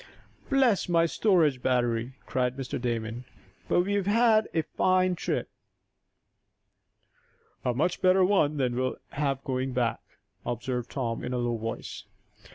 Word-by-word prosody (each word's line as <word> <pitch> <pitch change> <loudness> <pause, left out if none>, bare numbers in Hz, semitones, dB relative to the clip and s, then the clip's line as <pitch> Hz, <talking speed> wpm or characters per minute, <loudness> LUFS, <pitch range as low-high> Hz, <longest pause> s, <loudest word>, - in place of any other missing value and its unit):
"Bless 260 -9 +3
my 170 -1 +4
storage 165 - +2
battery!" 120 -1 0
cried 125 0 -1
Mr. 130 -2 -4
Damon. 115 0 -3 0.4
"But - - +3
we 200 +3 -1
have 200 -2 0
had 220 0 +4
a 160 - 0
fine 185 +3 +2
trip." 175 - -2 2.2
"A 125 -2 0
much 155 +7 0
better 185 0 +5
one 155 -7 +2
than 125 -3 0
we'll 130 +1 -1
have 140 -2 -2
going 130 0 -2
back," 120 -2 0 0.4
observed 120 0 -3
Tom, 120 -4 -3
in 125 - -3
a - - 0
low 120 -1 0
voice. 115 0 -6
135 Hz, 140 wpm, -28 LUFS, 125-185 Hz, 2.2 s, better